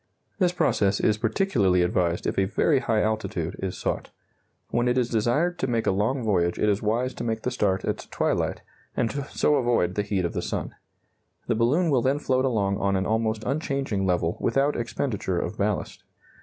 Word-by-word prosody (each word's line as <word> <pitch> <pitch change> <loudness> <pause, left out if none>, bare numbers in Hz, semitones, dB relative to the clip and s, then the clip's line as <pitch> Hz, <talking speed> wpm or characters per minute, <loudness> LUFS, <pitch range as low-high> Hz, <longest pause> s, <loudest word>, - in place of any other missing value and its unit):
This 180 -3 +3
process 100 - +1
is 110 -1 +2
particularly 110 - +2
advised 90 -1 0
if - - 0
a 95 - +3
very 135 +8 +2
high 110 -4 +1
altitude 110 -6 -2
is 95 -1 -3
sought. - - -3 0.6
When 120 +1 +1
it 125 +1 +2
is 125 -2 +1
desired 145 +11 +1
to 130 - 0
make 115 -2 0
a - - +3
long 110 +7 0
voyage 85 -5 +1
it - - +1
is 100 0 +1
wise 120 +4 0
to - - -6
make 110 -1 -2
the 125 - -1
start 100 -6 0
at - - -3
twilight, - - -1 0.3
and 115 - +1
so 145 +1 0
avoid 120 -9 +1
the 105 - 0
heat 100 -3 -1
of 85 - -2
the - - -2
sun. - - -4 0.7
The 120 - +1
balloon 140 +10 +2
will 130 -3 +3
then 135 +4 +2
float 130 -3 +1
along 100 -6 0
on 100 0 +1
an 95 0 0
almost 110 0 0
unchanging 135 -8 -1
level 85 -2 0
without 140 +2 +1
expenditure 115 -5 -2
of - - -2
ballast. - - -2
115 Hz, 195 wpm, -25 LUFS, 100-130 Hz, 0.7 s, This